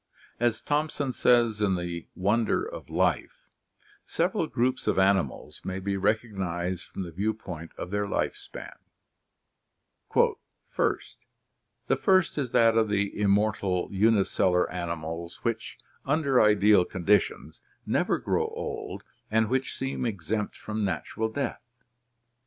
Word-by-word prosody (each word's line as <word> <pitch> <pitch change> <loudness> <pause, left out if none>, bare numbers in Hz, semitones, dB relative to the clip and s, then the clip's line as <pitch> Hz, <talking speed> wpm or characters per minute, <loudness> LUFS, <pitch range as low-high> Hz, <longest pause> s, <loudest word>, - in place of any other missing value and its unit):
As 120 -1 +1
Thomson 145 -2 -1
says 120 -4 +3
in 100 -3 +2
The 85 -1 -4
Wonder 105 - +1
of - - -8
Life, - - 0 0.6
several 200 -8 0
groups 130 0 0
of - - +2
animals 95 -7 +1
may 95 0 -3
be 100 +1 -2
recognized 95 -4 -1
from 95 - -5
the 85 - -7
view 105 +6 -1
point 85 -6 -8
of 90 - -6
their 105 0 0
life - - -1
span: - - -9 0.7
" - - -38
(1) - - +4 1.5
The 135 - +2
first 185 +3 +3
is 135 -4 -1
that 115 -1 +4
of 110 -1 +3
the 100 -1 0
immortal 100 -3 +1
unicellular 95 -3 +3
animals 85 -1 -5
which 115 -1 -2 0.3
[under 140 -2 +3
ideal 105 -2 +5
conditions] 95 +3 0 0.2
never - - +1
grow - - 0
old - - -5 0.3
and 110 0 +2
which 130 +1 -1
seem 135 -2 -2
exempt 105 +1 -3
from 110 0 -3
natural 100 +4 -2
death. 125 +2 -3
105 Hz, 130 wpm, -27 LUFS, 95-115 Hz, 1.5 s, ideal